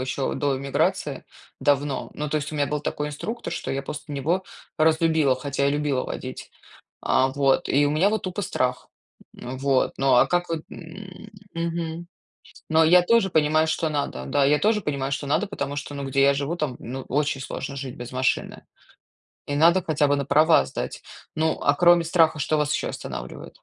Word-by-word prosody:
еще 130 +1 -2
до 140 -2 0
иммиграции, 140 0 -1 0.4
давно. 145 -1 0
Ну, 150 -1 -4
то 155 - +1
есть 145 +1 -5
у 155 - -7
меня 145 -1 +1
был 150 -1 -2
такой 150 0 -3
инструктор, 225 +11 -5
что - - -4
я 135 +1 -2
после 150 +1 -7
него 165 +7 0 0.4
разлюбила, 160 -4 +3
хотя 140 +1 -1
и - - +2
любила 145 -3 0
водить, 130 0 -7 0.5
а, 130 0 +3
вот. 135 +4 +1
И 145 +2 +3
у - - 0
меня 165 +7 +3
вот 215 -1 -1
тупо 185 +2 -4
страх, 125 -7 -2 0.5
м, 130 +1 -7
вот. 135 -1 +1
Ну 135 -1 +3
а 125 - +6
как 175 0 0
вот, 165 -2 -2
м, 190 +4 -11 0.2
мгм. 165 0 -3 0.6
Но 160 +1 +5
я 180 +2 +7
тоже 195 +1 +3
понимаю, 155 0 +2
что 160 0 0
надо, 140 - -3
да, 135 - +2
я 150 +1 +4
тоже 215 0 +2
понимаю, 140 -3 -2
что 140 +1 -3
надо, 200 +8 +1
потому 145 -8 -4
что, 145 0 -6
ну, 140 -1 -4
где 135 +1 +1
я 140 0 +5
живу, 140 +4 -2
там, 145 -7 -3
ну, 130 +3 -6
очень 140 -1 0
сложно 135 - -6
жить 135 -2 -6
без 120 0 -8
машины. 130 0 -1 0.8
И 145 - -2
надо 170 +4 +5
хотя 150 -2 +1
бы 145 - +2
на 140 - -2
права 155 - +4
сдать. - - -5 0.3
Ну, 160 0 0
а 145 - +3
кроме 175 +1 +5
страха, 165 -2 +3
что 155 +2 +1
вас 150 0 +1
еще - - -1
останавливает? 60 0 -7
150 Hz, 195 wpm, -24 LUFS, 140-165 Hz, 0.8 s, я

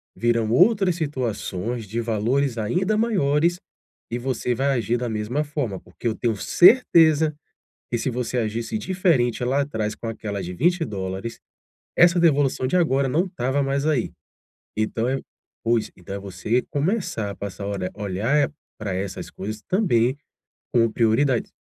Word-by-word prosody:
virão 115 -2 +1
outras 190 - +4
situações 120 - -3
de 110 +4 -4
valores 115 +3 0
ainda 180 - 0
maiores 175 -6 +2 0.5
e 120 - -2
você 125 -1 -1
vai 135 +4 0
agir 115 +1 0
da 120 -1 -3
mesma 110 +7 -1
forma, 140 -10 -3
porque - - -7
eu 110 - 0
tenho 115 -3 -1
certeza 160 - +5 0.6
que 120 - 0
se 130 - -1
você 125 +1 -2
agisse 115 - -2
diferente 160 - +1
lá 135 +3 +1
atrás 110 -6 -3
com 115 - -8
aquela 105 -3 -4
de 90 +1 -6
$20, 115 - -1 0.6
essa 175 0 +6
devolução 145 -5 +3
de 180 - +1
agora 140 -6 +2
não 170 +8 +1
estava 135 -4 -1
mais 140 +1 0
aí. 145 -7 +1 0.7
Então 110 +2 0
é 135 - 0 0.4
pois, 115 -1 +1
então 95 +2 -7
é - - -4
você 100 +5 -1
começar 145 - -1
a - - -8
passar 100 0 -6
a - - -3
ora 95 -2 -3
a 105 - -11
olhar 115 +10 +1 0.3
pra 100 -3 -3
essas 95 +1 -4
coisas 105 +2 -6
também 130 - +2 0.6
como 115 -2 +3
prioridade. 120 +2 +2
120 Hz, 155 wpm, -23 LUFS, 110-150 Hz, 0.7 s, essa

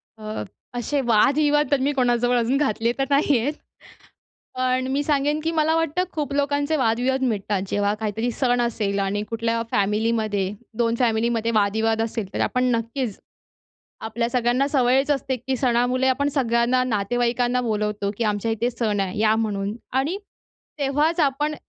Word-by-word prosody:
अ, 215 0 -5 0.3
असे 275 +4 -1
वादविवाद 290 +7 +3
तर 285 - +3
मी 280 +2 +2
कोणाजवळ 245 -2 +2
अजून 240 +3 +1
घातले 235 -5 +1
तर 270 - +1
नाहीयेत 280 -1 +2 1.1
पण 255 0 +1
मी 280 +2 +1
सांगेन, 290 0 +1
की 325 - 0
मला 320 0 +2
वाटतं 325 +2 0
खूप 295 -2 -3
लोकांचे 285 +2 0
वादविवाद 255 +1 +1
मिटतात, 210 -5 -1
जेव्हा 205 +1 0
काहीतरी 220 +2 -2
सण 245 0 +1
असेल 210 -4 -1
आणि 195 +1 -1
कुठल्या 230 0 -1
फॅमिलीमध्ये 210 -1 0 0.3
2 230 -1 +1
फॅमिलीमध्ये 230 -1 +1
वादविवाद 220 +2 +2
असेल, 225 -3 -3
तर - - -3
आपण 250 0 +1
नक्कीच, 230 -1 -3 0.8
आपल्या 230 +1 -2
सगळ्यांना 245 +2 +1
सवयच 265 0 +2
असते, 270 -2 0
की 260 +2 -3
सणामुळे 250 +1 +1
आपण 275 +2 +1
सगळ्यांना 240 -1 +2
नातेवाईकांना 245 +2 0
बोलवतो 210 -3 -1
की, 235 - 0
"आमच्या 210 +1 0
इथे 225 +2 0
सण 215 -4 -1
आहे, 195 0 -2
या 215 0 +4
म्हणून" 205 -2 -2 0.2
आणि 320 +9 -2 0.6
तेव्हाच 295 +5 +1
आपण, 295 +1 +1
240 Hz, 150 wpm, -23 LUFS, 220-275 Hz, 1.1 s, या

